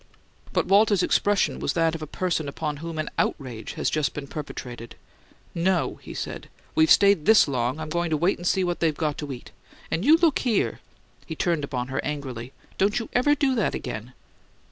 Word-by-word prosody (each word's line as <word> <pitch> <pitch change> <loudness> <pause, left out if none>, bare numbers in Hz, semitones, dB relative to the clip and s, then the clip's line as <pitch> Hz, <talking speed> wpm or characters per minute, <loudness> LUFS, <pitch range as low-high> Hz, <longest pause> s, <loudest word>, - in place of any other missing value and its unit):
But - - +1
Walter's 200 -1 +4
expression 205 -1 +2
was - - -1
that 165 -1 +2
of 165 - -5
a 155 - -5
person 170 -2 -1
upon 150 0 -4
whom 165 +2 -6
an 155 - -2
outrage 120 -5 -2
has - - -2
just 155 -2 0
been 145 - -5
perpetrated. 125 -5 -7 0.6
"No," 175 +1 0
he - - -9
said. - - -6 0.2
"We've 160 0 +4
stayed 200 -6 +5
THIS 220 -6 +7
long, 130 +1 -1
I'm 155 0 -5
goin' 170 +1 -1
to 155 - +1
wait 175 +5 +1
and 175 - -3
see 190 - +2
what 175 -1 -1
they 165 -2 +3
got 150 0 -2
to 145 -2 -5
eat. 125 -2 -9 0.4
And 170 - 0
you 310 +6 +7
look 330 -4 +3
here!" 230 -6 0 0.5
He 160 - -5
turned 165 -2 0
upon 125 -2 -3
her 135 - -2
angrily. 130 -5 -5 0.3
"Don't 200 +2 +2
you 230 - -3
ever 290 +4 +3
do 275 -2 +1
that 225 -5 0
again!" 125 0 -6
160 Hz, 200 wpm, -25 LUFS, 140-190 Hz, 0.6 s, THIS